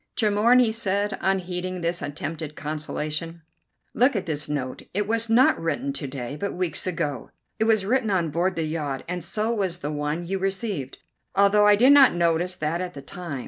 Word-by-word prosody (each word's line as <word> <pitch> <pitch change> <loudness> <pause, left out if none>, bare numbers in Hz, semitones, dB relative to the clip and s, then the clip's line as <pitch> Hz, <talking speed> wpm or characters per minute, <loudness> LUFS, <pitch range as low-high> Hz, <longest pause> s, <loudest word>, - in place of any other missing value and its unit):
"Tremorne," 220 +3 +4
he 230 -3 +3
said, 205 -2 -1
unheeding 185 -1 -1
this 170 +1 -1
attempted 150 +1 -5
consolation, 155 +2 -4 0.5
"look 250 +2 +3
at 200 - -1
this 150 -2 -2
note. 130 -3 -3
It 205 0 0
was 230 +1 +1
not 235 -2 +4
written 255 +12 -2
to 145 - -4
day, 130 0 -5
but 200 +4 -4
weeks 180 0 -1
ago. 145 -8 -3 0.3
It 220 - +2
was 220 -3 +2
written 245 +1 +1
on 175 -5 0
board 175 +4 0
the 165 - -1
yacht, 150 -4 -3
and 180 0 -4
so 215 +6 -1
was 190 -6 -1
the 150 -3 -4
one 150 +3 -2
you 190 +2 -2
received, 190 - -3 0.4
although 200 +1 +5
I 205 - +7
did 250 +6 +5
not 275 -8 +7
notice 170 +1 +1
that 160 +2 -2
at 180 -1 -5
the 140 - -8
time. 165 -2 -6
180 Hz, 190 wpm, -24 LUFS, 155-205 Hz, 0.5 s, I